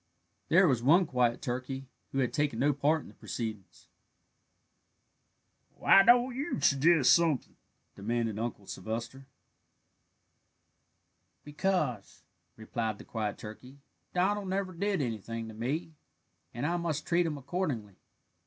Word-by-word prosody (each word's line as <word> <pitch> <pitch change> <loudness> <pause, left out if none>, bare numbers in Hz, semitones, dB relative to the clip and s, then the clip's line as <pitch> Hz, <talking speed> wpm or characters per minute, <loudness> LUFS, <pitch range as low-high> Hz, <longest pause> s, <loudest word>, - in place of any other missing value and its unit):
There 180 +3 +6
was 130 -6 +2
one 165 +9 +5
quiet 125 -4 +1
turkey 130 +1 -4 0.3
who - - -4
had 130 -3 +1
taken 145 -6 0
no 145 +4 +3
part 145 +3 +1
in - - -13
the - - -14
proceedings. 110 -5 -6 1.9
"Why 195 - +6
don't 245 +3 +5
you 275 - -2
suggest 145 +1 +5
something?" 165 -6 +1 0.4
demanded 115 +1 -2
Uncle 115 -3 -4
Sylvester. 115 +8 -6 2.2
"Because," 150 - -2 0.3
replied 110 -1 -3
the - - -11
quiet 110 -3 -3
turkey, 125 +5 -10 0.3
"Donald 195 +2 0
never 190 0 -2
did 195 0 -1
anything 115 -1 -4
to - - -9
me, 140 +9 -3 0.6
and 120 +4 -4
I 175 +3 +1
must 160 -3 -2
treat 170 0 +2
him 150 -2 -3
accordingly. 135 - -3
135 Hz, 125 wpm, -30 LUFS, 115-170 Hz, 2.2 s, There